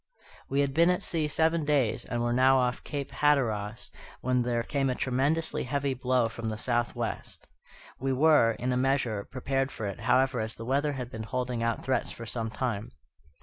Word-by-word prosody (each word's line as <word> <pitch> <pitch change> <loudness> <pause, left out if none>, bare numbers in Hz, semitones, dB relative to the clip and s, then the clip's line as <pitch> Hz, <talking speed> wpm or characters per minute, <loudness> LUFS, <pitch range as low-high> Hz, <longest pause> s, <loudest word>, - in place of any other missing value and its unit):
We 140 +1 +2
had 140 -1 0
been 170 +4 +5
at 180 +2 +1
sea 160 -4 0
seven 160 +2 +1
days, 145 -7 +1
and 120 0 -2
were 120 0 +1
now 130 +2 +5
off 125 -1 0
Cape 140 -2 -5
Hatteras, 115 -7 0 0.3
when 125 0 +1
there 120 -1 0
came 135 +2 0
a 125 - 0
tremendously 140 +7 0
heavy 140 +1 -1
blow 130 -2 +1
from 115 0 -5
the 110 - -4
southwest. 120 +1 -2 0.5
We 135 +1 -1
were, 135 -4 +5
in 125 +3 -2
a - - +1
measure, 125 -6 0
prepared 135 +1 -1
for 110 - -5
it, 100 -2 -4
however, 130 -1 +2
as 110 0 -3
the 115 - -8
weather 140 +4 +1
had 125 -2 -5
been 110 - -6
holding 125 +1 -3
out 115 0 -1
threats 130 0 0
for 115 - -7
some 115 -1 -3
time. 110 -2 -3
130 Hz, 190 wpm, -28 LUFS, 115-140 Hz, 0.5 s, been